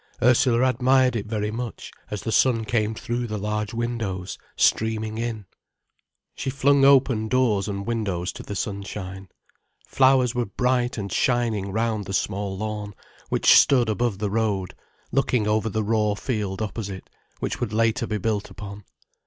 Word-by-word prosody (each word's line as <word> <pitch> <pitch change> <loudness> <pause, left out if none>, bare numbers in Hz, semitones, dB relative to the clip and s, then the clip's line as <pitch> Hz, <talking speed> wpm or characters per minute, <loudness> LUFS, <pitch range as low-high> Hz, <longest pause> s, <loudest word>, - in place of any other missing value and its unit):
Ursula 125 0 +4
admired 130 -1 +3
it 110 -2 -3
very 105 -1 -2
much, 120 +1 -6 0.2
as 105 -2 -5
the 115 - -2
sun 115 -2 +3
came 110 0 0
through 120 +2 -3
the 110 -1 -3
large 105 +1 -2
windows, 115 -6 -3 0.2
streaming 110 0 +1
in. 115 -3 -3 0.9
She - - -4
flung 140 +1 +3
open 130 -5 +4
doors 110 -5 +2
and 100 -1 -4
windows 100 -6 -2
to - - -8
the 100 - -6
sunshine. 100 -1 -5 0.6
Flowers 130 -2 +3
were 120 -1 -1
bright 125 +4 0
and 100 -2 -4
shining 115 -6 +1
round 110 -1 -1
the 100 - -6
small 100 0 -2
lawn, 105 -1 -4 0.3
which - - +5
stood 125 -5 +4
above 110 -1 0
the 100 0 -2
road, 105 -4 -1 0.4
looking 125 -5 +1
over 110 +1 +1
the 110 +1 -1
raw 105 -1 +1
field 105 -3 -3
opposite, 100 -3 -5 0.3
which - - -3
would 120 -4 -2
later 115 +2 +1
be 105 - -1
built 105 0 -2
upon. 100 0 -9
110 Hz, 155 wpm, -24 LUFS, 105-120 Hz, 0.9 s, which